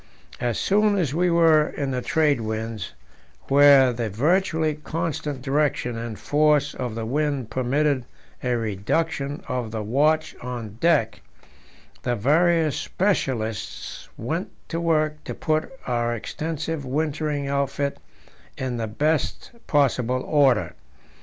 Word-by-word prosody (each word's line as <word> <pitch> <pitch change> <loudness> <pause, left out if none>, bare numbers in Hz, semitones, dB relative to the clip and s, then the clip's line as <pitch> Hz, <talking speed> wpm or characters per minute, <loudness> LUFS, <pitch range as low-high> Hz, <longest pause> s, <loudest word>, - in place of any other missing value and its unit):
As 120 -3 -1
soon 205 +1 +3
as 160 -8 0
we 175 +3 +2
were 165 -3 +5
in 140 -2 -3
the 125 -1 -1
trade 150 -4 +2
winds, 110 -2 -4 0.6
where 140 -2 +7
the 115 -2 -2
virtually 160 - +1
constant 150 -3 -4
direction 140 -3 0
and 115 -1 -5
force 150 -1 +2
of 125 -3 -4
the 115 -1 -3
wind 140 -2 -1
permitted 130 +2 +1 0.4
a 125 -1 0
reduction 140 +7 -2
of 125 -3 -2
the 110 -1 -4
watch 150 +8 +1
on 120 -4 -6
deck, 165 0 +2 0.8
the 120 -1 0
various 160 - +3
specialists 125 - -2
went 160 - -3 0.2
to 165 0 -2
work 155 -2 +1
to - - -5
put 155 0 -1
our 120 -1 0
extensive 160 +5 -4
wintering 145 +1 -1
outfit 140 0 -1 0.6
in 130 -2 -3
the 115 -1 -2
best 150 +7 -1 0.2
possible 130 -3 +2
order. 135 -7 +3
140 Hz, 125 wpm, -24 LUFS, 120-155 Hz, 0.8 s, where